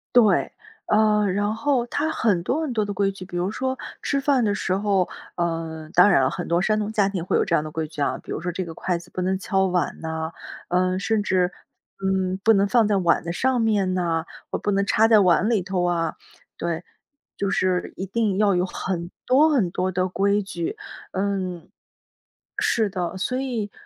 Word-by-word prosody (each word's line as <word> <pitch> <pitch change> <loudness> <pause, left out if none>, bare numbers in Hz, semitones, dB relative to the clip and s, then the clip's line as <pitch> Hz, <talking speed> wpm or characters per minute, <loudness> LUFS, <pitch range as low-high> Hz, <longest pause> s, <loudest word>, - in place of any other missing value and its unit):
对， 230 -4 +4 0.4
呃， 210 -1 +3
然 205 +2 0
后 250 +1 +1
他 295 +6 -1
很 215 - +1
多 275 - 0
很 300 -6 -2
多 215 -2 +1
的 205 - -4
规 195 0 +1
矩， 190 -1 -10
比 175 -1 -6
如 180 +3 -1
说， 260 +3 -2 0.2
吃 280 - 0
饭 275 -2 +2
的 205 -2 +1
时 185 - -1
候， 195 -2 +1 0.3
呃 165 -2 -3
当 180 +3 +7
然 155 -9 +4
了， 130 - +3
很 - - -5
多 170 +1 +2
山 215 +2 +1
东 210 0 -2
家 205 -3 +2
庭 190 -4 -3
会 180 - +1
有 - - +2
这 170 - +1
样 150 - +1
的 155 - -7
规 160 0 -3
矩 150 -1 -7
啊。 140 - 0
比 - - -11
如 - - -3
说 180 +1 -2
这 185 +2 -3
个 165 - -7
筷 175 +1 -2
子 170 - -13
不 185 - -4
能 190 +1 0
敲 190 0 +1
碗 180 -2 -1
呐， 160 0 -3 0.4
嗯 185 +1 +1
甚 220 +2 +1
至， 185 -2 +1 0.5
嗯， 190 -1 0
不 225 - +6
能 200 -1 +3
放 230 0 +3
在 205 -1 +2
碗 175 -3 +2
的 170 - -3
上 255 +5 +1
面 205 -4 +1
呐， 165 -3 0 0.2
或 - - -2
不 205 - -1
能 200 0 +1
插 220 +2 +4
在 220 -2 +6
碗 185 +2 +4
里 225 -5 +2
头 185 0 -1
啊。 170 -2 0 0.4
对， 170 0 -3 0.5
就 200 -1 -1
是 185 -2 0
一 190 - -4
定 205 0 0
要 205 -2 +3
有 180 +1 +2
很 180 -2 -4
多 280 +5 +5
很 245 - +2
多 185 +2 -1
的 185 0 0
规 200 +2 +1
矩， 175 -4 -4 0.3
嗯， 190 -3 -2 0.9
是 220 -2 +2
的。 180 -1 -3
所 250 +7 -1
以， 235 -6 -3
190 Hz, 230 characters per minute, -23 LUFS, 180-215 Hz, 0.9 s, 当